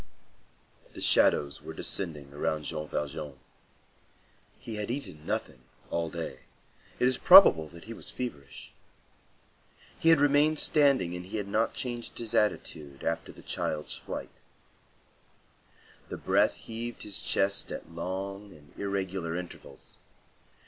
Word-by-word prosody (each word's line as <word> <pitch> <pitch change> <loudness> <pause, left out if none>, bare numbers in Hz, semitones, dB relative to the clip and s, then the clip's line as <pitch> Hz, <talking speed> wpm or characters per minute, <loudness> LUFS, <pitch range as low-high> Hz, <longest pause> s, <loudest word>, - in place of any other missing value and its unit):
The - - -7
shadows 70 -1 +3
were - - -8
descending 75 -7 -3
around 75 +1 -1
Jean 75 +1 -4
Valjean. 75 -1 -4 1.2
He 110 -2 -7
had 105 0 -3
eaten 120 - -5
nothing 65 - -3 0.3
all 85 -1 0
day; 80 -5 -5 0.6
it 125 - +3
is 130 -1 +1
probable 130 - +9
that 85 +1 -13
he 115 - -7
was - - -9
feverish. 70 - -7 1.3
He 165 - +4
had 165 -2 +7
remained 145 +2 +4
standing 140 - +3
and 90 - -5
had 100 0 -3
not 110 +3 +1
changed 120 -3 -4
his 115 -1 -5
attitude 75 -10 -1
after 80 0 -2
the - - -15
child's 75 -1 -2
flight. - - -7 1.7
The - - -5
breath - - +3
heaved 115 +1 -6
his 105 -2 -3
chest 100 0 0
at - - -7
long 95 +4 -5
and 75 -2 -18
irregular 95 -4 -2
intervals. 90 -1 -8
95 Hz, 130 wpm, -29 LUFS, 80-115 Hz, 1.7 s, probable